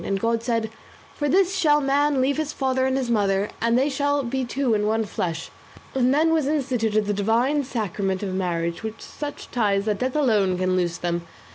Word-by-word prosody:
And 195 0 -1
God 230 +2 0
said 230 -2 -1 0.4
'For 290 -1 -2
this 380 +4 +3
shall 310 -6 +4
a - - 0
man 280 0 +2
leave 275 +2 +1
his 310 -1 -1
father 260 -1 0
and 265 0 0
his 250 -3 -1
mother, 200 -2 +1
and 230 +1 +3
they 265 +3 +3
shall 285 0 0
be 260 +2 -2
two 255 0 0
in 210 -1 +1
one 220 +1 +1
flesh; 165 -5 -4 0.4
and 255 -1 +2
then 315 +3 +3
was 310 -4 +1
instituted 245 -8 0
the 205 - 0
divine 235 +8 +1
sacrament 200 -6 -2
of 190 -2 -3
marriage, 170 -2 -2
with 220 0 -6
such 295 -1 -7
ties 205 -4 +1
that 210 -2 -1
death 255 +2 -1
alone 210 -10 +2
can 185 0 +1
loose 175 -2 0
them. 170 -1 -3
230 Hz, 210 wpm, -24 LUFS, 200-275 Hz, 0.4 s, shall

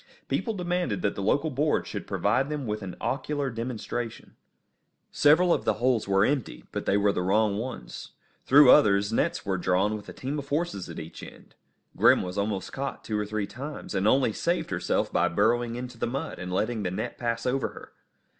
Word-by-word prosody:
People 225 -3 -1
demanded 175 - -1
that 100 - +1
the - - -5
local 145 +10 +1
board 150 +3 +1
should - - -6
provide 135 +2 +1
them 150 -3 -3
with 105 -1 -3
an 95 -2 -6
ocular 140 0 -2
demonstration. 115 0 -5 0.8
Several 170 +4 +5
of - - -1
the - - +1
holes 120 -2 +1
were 95 +1 +4
emptied, 125 - -2
but - - -4
they 100 - +3
were 100 0 +3
the 90 - -2
wrong 100 +2 +2
ones. 110 - -7 0.3
Through 140 -1 +8
others 100 +1 +5
nets - - 0
were 95 -2 -1
drawn 95 +4 +1
with 105 - -9
a - - -8
team 140 +3 -4
of 140 0 -8
horses 145 - -2
at - - -8
each - - -8
end. - - -13 0.4
Grim - - +5
was 90 0 -5
almost 100 -1 -2
caught 135 0 -4
two 105 -1 -2
or 105 - -2
three 110 -1 -2
times, 140 +6 -7
and 100 +1 +1
only 130 -1 +3
saved 170 - -1
herself 90 -1 -1
by - - +3
burrowing 115 +5 +1
into 125 -1 -7
the - - 0
mud, 135 +4 -4
and 90 0 -5
letting 110 +4 -1
the 95 - -1
net 90 - -4
pass 115 -1 -2
over 130 +1 +1
her. - - -12
115 Hz, 200 wpm, -27 LUFS, 100-135 Hz, 0.8 s, Through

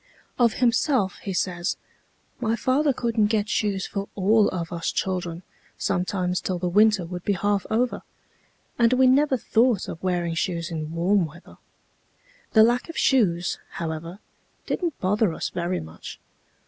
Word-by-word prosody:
Of 235 -2 +4
himself 235 -4 +1
he 195 - -5
says: 180 -1 -1 0.6
"My 230 -2 0
father 270 +5 +2
couldn't 230 -4 +1
get 210 -1 0
shoes 205 -3 0
for 200 -1 -5
all 210 +2 +4
of 170 -2 -4
us 170 -1 -2
children 180 -2 -3 0.3
sometimes 180 -1 -1
till 185 - -2
the 180 +1 -2
winter 205 0 +4
would 180 +1 -7
be 205 - +1
half 200 +1 0
over, 240 +3 0 0.8
and 235 +1 +4
we 260 +1 +4
never 270 +1 +4
thought 230 -2 +2
of 165 - -7
wearing 175 -2 -1
shoes 170 0 -2
in 155 -1 -4
warm 175 +2 +2
weather. 170 +4 -16 0.9
The 220 - +7
lack 240 +6 +2
of 330 - -7
shoes, 180 -10 +2
however, 165 +2 -5 0.5
didn't 340 -5 -2
bother 200 -1 +1
us - - -3
very 175 +1 -2
much. 80 0 -10
195 Hz, 150 wpm, -24 LUFS, 175-230 Hz, 0.9 s, The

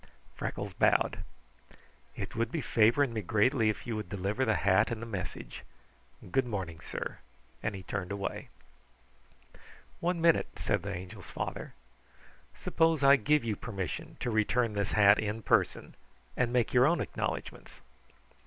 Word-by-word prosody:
Freckles - - -4
bowed. - - +2 1.0
"It - - -6
would 115 +1 -1
be 165 - -1
favoring 120 +1 +3
me 110 - -2
greatly 110 +4 +2
if 110 - -3
you 115 - -3
would 105 -1 -5
deliver 100 +6 -1
the 110 - +2
hat 100 +2 +3
and 115 - -3
the 115 - -6
message. 100 -5 -6 0.7
Good 130 +3 +2
morning, 95 -7 -4
sir," - - -6 0.4
and 110 - -2
he 95 - -8
turned 100 -1 -4
away. 100 -1 -4 1.5
"One 175 0 0
minute," 165 0 +4
said 100 -3 0
the 100 +2 -4
Angel's 90 -1 -8
father. - - -5 0.8
"Suppose 160 -3 +1
I 140 +1 +8
give 150 +3 +2
you 110 -2 -1
permission 95 -4 -5
to 120 - -1
return 110 +1 +1
this 100 0 -1
hat 105 0 +6
in 110 +1 -2
person - - +1 0.4
and 120 -1 +1
make 125 -2 +1
your 125 +2 +6
own 170 0 +2
acknowledgments." - - -5
110 Hz, 150 wpm, -31 LUFS, 100-125 Hz, 1.5 s, I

